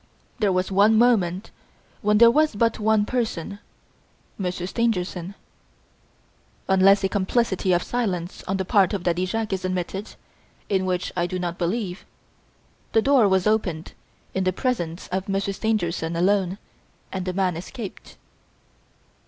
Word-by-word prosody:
There 205 -2 +2
was 185 +1 0
one 205 +3 +5
moment 205 -6 +2 0.5
when 210 0 +3
there 235 +1 +8
was 305 -1 +2
but 230 +1 +1
one 215 -1 +2
person, 210 -5 -3 0.8
Monsieur 180 -2 -3
Stangerson. 190 -4 -2 1.3
Unless 195 +1 +5
a - - +3
complicity 190 0 0
of 175 0 +2
silence 185 -8 -3
on 190 - 0
the 190 - -2
part 195 +1 +3
of 190 - -4
Daddy 180 +1 0
Jacques 220 +1 -2
is 190 - -3
admitted 185 +2 -3 0.5
in 190 -2 +1
which 180 -1 -2
I 175 -1 0
do 185 - -4
not 175 -1 -4
believe 185 +1 -2 0.9
the 225 - +5
door 270 -6 +5
was 190 -1 +2
opened 200 -7 0 0.4
in 190 - 0
the 185 - +2
presence 180 -6 -2
of 190 +2 -3
Monsieur 195 0 -1
Stangerson 175 -6 -1
alone 190 +1 +1 0.5
and 190 -1 -4
the 185 - -1
man 185 -2 0
escaped. 200 +5 -8
190 Hz, 145 wpm, -24 LUFS, 180-215 Hz, 1.3 s, there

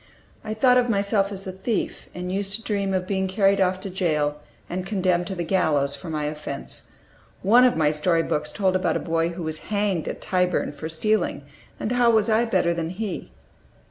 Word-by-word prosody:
I 215 - -4
thought 250 +2 +5
of 245 -1 0
myself 200 -1 +1
as 195 -1 -6
a 190 - -4
thief, 195 +4 -3
and 180 0 -4
used 195 +1 -1
to 225 - -2
dream 200 -3 -1
of 185 -1 0
being 190 0 -1
carried 195 +1 +3
off 185 0 +2
to 195 - -5
jail 150 -5 0 0.3
and 185 +1 -3
condemned 185 -3 0
to 195 - -4
the 175 - -2
gallows 150 -6 +1
for 165 +4 -9
my 155 -1 -2
offense: 150 -2 -6 0.6
one 235 +6 +6
of 250 - +3
my 150 -2 +3
story 165 +2 +1
books 150 -1 -2
told 190 -2 +1
about 185 -1 +1
a - - -3
boy 165 0 0
who 170 0 -6
was 160 0 -3
hanged 205 -5 0
at - - -4
Tyburn 180 -1 0
for 155 +2 -6
stealing, 175 -1 0 0.4
and 215 - -2
how 245 -1 +4
was 220 -1 +3
I 225 +2 +3
better 170 -7 +2
than 165 -1 -3
he? 200 +2 -5
185 Hz, 205 wpm, -24 LUFS, 165-205 Hz, 0.6 s, one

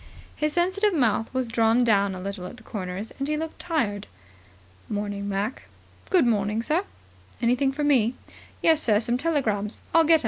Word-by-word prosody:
His 300 0 -1
sensitive 375 +3 +2
mouth 230 -5 +1
was 260 -2 -1
drawn 230 +1 +3
down 200 -4 +3
a - - -6
little 190 -1 -5
at 240 - -10
the - - -15
corners, 190 0 -5
and 275 - -1
he 305 0 0
looked 320 +1 -5
tired. 215 - -1 0.8
"Morning, 205 -1 -3
Mac." 205 +5 -2 0.4
"Good 360 -8 +4
morning, 215 -1 +1
sir." 325 +9 +1 0.5
"Anything 250 +3 +2
for 295 +2 -3
me?" 255 -5 +3 0.5
"Yes, 320 -2 +5
sir. 210 -3 +3
Some 240 +2 0
telegrams. 225 -10 -1
I'll 330 - +6
get 325 +1 +5
'em. - - +3
235 Hz, 175 wpm, -25 LUFS, 205-300 Hz, 0.8 s, I'll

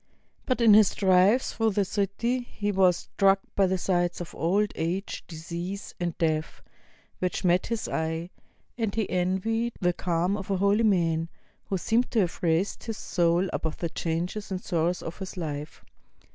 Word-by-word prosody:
But 255 -2 +1
in 225 -2 +7
his 210 -1 +6
drives 195 +5 +4
through 225 -2 +1
the 200 0 +2
city 205 +6 -1
he 210 -4 -3
was 185 -3 +4
struck 195 0 +2 0.2
by 195 -1 +4
the 190 +1 0
sights 175 -1 0
of 175 - -7
old 200 +5 +1
age, 180 +5 -3
disease, 170 +4 -6
and 175 -2 -2
death 155 -1 -1 0.6
which 180 -1 -2
met 180 +1 +3
his 230 -1 -2
eye; 160 +2 -2 0.5
and 220 -3 -1
he 220 -3 0
envied 190 +6 0
the 180 -2 +2
calm 175 +3 0
of 195 -1 -7
a 195 - +1
holy 200 +3 +3
man, 165 -5 +2 0.4
who 195 - -1
seemed 230 +7 +1
to 225 - +2
have 180 -3 -2
raised 170 +3 0
his 225 -2 -4
soul 175 +1 +1
above 160 -1 -3
the 170 - -2
changes 175 +6 -3
and 190 -1 -4
sorrows 175 0 0
of 165 - -7
this 190 0 -7
life. 150 -3 -5
185 Hz, 170 wpm, -27 LUFS, 170-205 Hz, 0.6 s, in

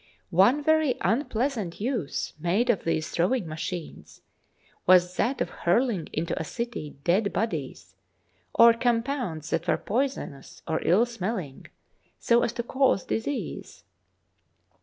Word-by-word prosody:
One 205 - +4
very 315 -4 +3
unpleasant 230 - -1
use 225 - -2
made 195 +9 +2
of 210 - -3
these 160 -1 -1
throwing 180 +3 +1
machines 160 +2 -7 0.6
was 180 0 +5
that 260 +3 0
of - - -1
hurling 200 0 +1
into 160 +2 -2
a - - -2
city 235 -5 -5
dead 200 +4 +2
bodies, 225 +2 -3 0.6
or 235 0 +7
compounds 230 - -1
that 165 +2 -1
were - - +2
poison 265 - -2
ous 135 - -15
or 160 -1 -1
ill 195 +8 +4
smelling, 195 - -5 0.5
so 235 0 +3
as - - 0
to 235 - -3
cause 260 -5 +1
disease. 270 +5 -4
220 Hz, 130 wpm, -26 LUFS, 175-245 Hz, 0.6 s, or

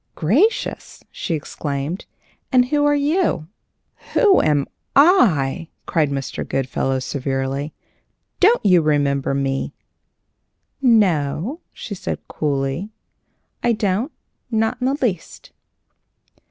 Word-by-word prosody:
"Gracious!" 275 - 0
she 170 - -3
exclaimed. 145 +2 -4 0.4
"And 250 -1 +4
who 290 0 +2
are 290 0 +4
you?" 290 - 0 0.7
"Who 410 -5 +5
am 145 -2 +2 0.3
I?" 185 - +4 0.2
cried 155 -4 +1
Mr. 135 -1 -3
Goodfellow, 135 0 -1
severely. 135 +2 -3 0.6
"Don't 430 - +4
you 180 -3 +6
remember 140 -3 +1
me?" 135 -1 -2 1.1
"No," 205 - +2
she 210 - -7
said, 190 - -5
coolly; 140 +5 -2 0.7
"I 240 - +2
don't, 210 - -1 0.4
not 225 +1 0
in 250 - +1
the 275 +2 0
least." 200 - -3
170 Hz, 100 wpm, -21 LUFS, -, 1.1 s, you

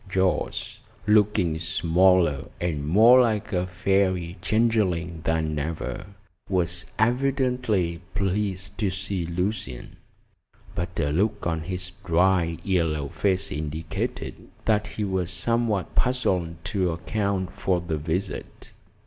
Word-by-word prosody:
Jorce, 95 -1 0 0.3
looking 105 -6 +3
smaller 85 -1 +3
and 75 -5 -2
more 115 +9 +7
like 110 -4 0
a 90 0 +1
fairy 95 -1 +1
changeling 95 -6 +1
than 80 -2 0
ever, 80 +3 -4 0.4
was 90 -1 0
evidently 120 -7 +1
pleased 100 -1 -1
to 105 -4 +2
see 95 -2 -3
Lucian, 90 - -3 0.8
but 85 0 -4
a 75 - +1
look 100 +8 0
on 80 -2 0
his 90 +1 -4
dry, 85 -1 +2
yellow 80 -7 0
face 95 +2 0
indicated 75 +2 -4 0.2
that 105 -1 +2
he 105 0 -4
was 95 -3 -1
somewhat 105 +1 0
puzzled 95 -10 +1
to 90 +1 0
account 95 +2 -2
for 90 -2 0
the 85 -2 -3
visit. 90 +6 -4
90 Hz, 115 wpm, -25 LUFS, 85-105 Hz, 0.8 s, more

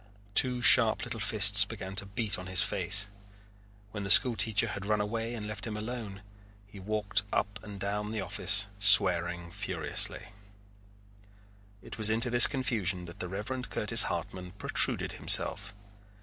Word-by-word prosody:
Two 125 +1 +2
sharp 115 -3 +4
little 115 -2 -5
fists 100 0 +4
began 100 -2 -9
to 100 - -1
beat 100 -1 -2
on 95 - -10
his 95 -1 +1
face. 100 +2 -1 0.9
When 105 - -7
the 100 - -6
school 120 +3 +7
teacher 110 +2 0
had 100 -1 -7
run 105 0 0
away 115 +3 -4
and 110 -2 -7
left 110 +1 -7
him 105 -1 -6
alone, 105 -3 -8 0.4
he 100 0 -15
walked 105 +1 -2
up 100 -2 -3
and 100 -1 -11
down 105 +2 -4
the 110 - -5
office 100 +1 0
swearing 85 -3 +4
furiously. 95 0 -3 1.5
It - - -11
was 110 -1 +1
into 115 +2 +1
this 120 0 +6
confusion 105 -10 -3
that 85 - -13
the 90 - -5
Reverend 115 +7 -6
Curtis - - +1
Hartman 90 -1 -7
protruded 100 - -2
himself. 100 0 +2
105 Hz, 155 wpm, -28 LUFS, 95-110 Hz, 1.5 s, school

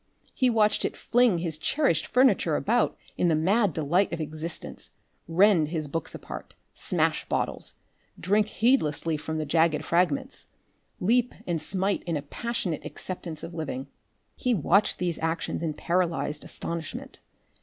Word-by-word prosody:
He 255 -2 +2
watched 215 -2 +3
it - - -2
fling 245 -6 +3
his 165 -2 -1
cherished 265 - +1
furniture 235 - +3
about 235 +8 +1 0.2
in 180 - +3
the 165 - +3
mad 195 +6 +3
delight 160 +6 +1
of 170 - -3
existence, 155 +2 -4 0.4
rend 175 -1 +4
his 155 -1 -3
books 165 +4 -4
apart, - - -9 0.2
smash - - 0
bottles, - - -2 0.4
drink 205 +4 +2
heedlessly 165 - +1
from 160 +1 -4
the 155 - -2
jagged 155 0 +2
fragments, 255 +11 0 0.5
leap 240 +6 +2
and 170 -3 -1
smite 195 +4 0
in 170 -3 -1
a 145 - -5
passionate 185 0 -3
acceptance 170 -4 -6
of 170 - -7
living. 140 -4 -4 0.5
He 250 -2 +1
watched 195 +4 +3
these 175 -3 -2
actions 165 +1 -2
in 160 -3 -2
paralysed 165 -5 -1
astonishment. 165 -2 -5
170 Hz, 145 wpm, -27 LUFS, 155-210 Hz, 0.5 s, rend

